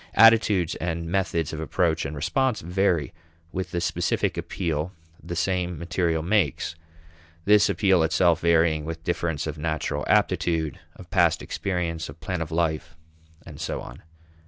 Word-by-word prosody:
Attitudes 110 -6 +5
and 85 0 -3
methods 85 -5 0
of 80 - -4
approach 80 +1 0
and 70 +2 -4
response 130 - 0
vary 90 -4 0 0.4
with 95 0 -3
the 90 - -2
specific 85 - 0
appeal 85 -2 -2 0.3
the 85 - -5
same 90 0 -1
material 85 -1 -1
makes, 90 -7 +1 0.7
this 105 0 +5
appeal 95 -4 +3
itself 85 +1 +3
varying 80 -2 +3
with 80 +1 -6
difference 85 -3 -1
of - - -5
natural 80 0 -2
aptitude, 80 -3 +1 0.2
of - - -14
past - - +3
experience, 85 -3 -3
of - - -11
plan 80 +2 -3
of 80 - -3
life, 80 -3 -1 0.5
and - - -10
so - - -3
on. - - -10
85 Hz, 145 wpm, -25 LUFS, 80-90 Hz, 0.7 s, Attitudes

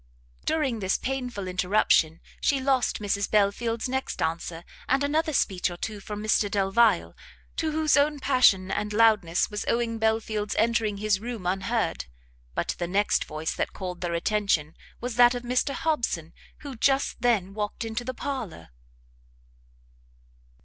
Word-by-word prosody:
During 270 -8 0
this 190 -1 +1
painful 250 -7 -4
interruption 180 -3 +2 0.2
she 280 - +2
lost 265 -2 +1
Mrs 200 -1 -1
Belfield's 220 +3 +1
next 265 +1 -3
answer, 165 +1 -2 0.3
and 270 +2 +3
another 310 +2 +1
speech 190 -10 +1
or 175 - -7
two 210 +3 -5
from 210 +1 -6
Mr 215 -1 +2
Delvile, 200 0 +2 0.4
to 320 -1 0
whose 310 0 +2
own 290 +1 +2
passion 250 -9 +4
and 210 +1 -2
loudness 210 -6 +3
was 210 - -3
owing 230 -1 0
Belfield's 220 -1 0
entering 225 -2 +1
his 205 -1 +1
room 230 -3 -6
unheard: 190 - -1 0.5
but - - -1
the 175 - -1
next 200 +3 +1
voice 155 +1 -3
that - - -3
called 180 -2 -6
their 175 -1 -2
attention 170 -5 0 0.2
was 245 -1 -5
that 245 0 +6
of 245 - -5
Mr 250 +3 0
Hobson, 235 - -1 0.3
who 280 -3 -7
just 270 +1 +1
then 210 -6 +1
walked 210 +2 -3
into 225 +2 -3
the 255 +1 -5
parlour. 225 - -5
215 Hz, 150 wpm, -26 LUFS, 190-245 Hz, 0.5 s, that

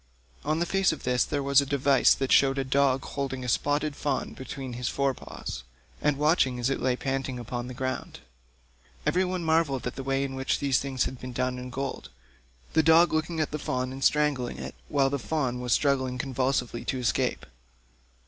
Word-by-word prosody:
On 155 +2 0
the 170 - +1
face 195 +1 +2
of 160 - -6
this 125 -1 +2
there 145 -2 -2
was 140 0 +5
a - - -1
device 140 -1 +4
that 135 -1 -2
shewed 135 0 +5
a 135 - +1
dog 135 0 +2
holding 135 -2 -4
a - - -4
spotted 145 +4 0
fawn 145 -2 -2
between 130 -1 -7
his 120 0 -2
fore 140 -1 +1
paws, 65 - -7 0.4
and 150 -2 +2
watching 150 -4 +2
it - - -5
as 120 - +1
it - - -1
lay 125 -1 +2
panting 135 -1 -2
upon 120 +1 -5
the 125 - -7
ground. 130 +1 -4 0.9
Every 185 - +2
one 180 -1 -2
marvelled 160 -5 +1
at 125 - -2
the 135 - -5
way 135 +1 0
in 135 -1 -3
which 130 0 0
these 140 -2 +2
things 135 -2 -1
had 130 - -4
been 125 0 -7
done 125 +1 -1
in 125 0 -7
gold, 135 +1 -4 0.6
the 160 - +5
dog 160 +2 +5
looking 160 +1 -1
at 155 - 0
the 150 - -3
fawn, 130 -2 -2
and 135 +1 -6
strangling 145 -5 +2
it, - - -6
while 135 -2 +2
the 140 - -1
fawn 130 -3 -1
was 125 -1 -3
struggling 130 -2 +2
convulsively 130 -2 -1
to 130 - -1
escape. 125 -2 0
135 Hz, 205 wpm, -27 LUFS, 125-145 Hz, 0.9 s, was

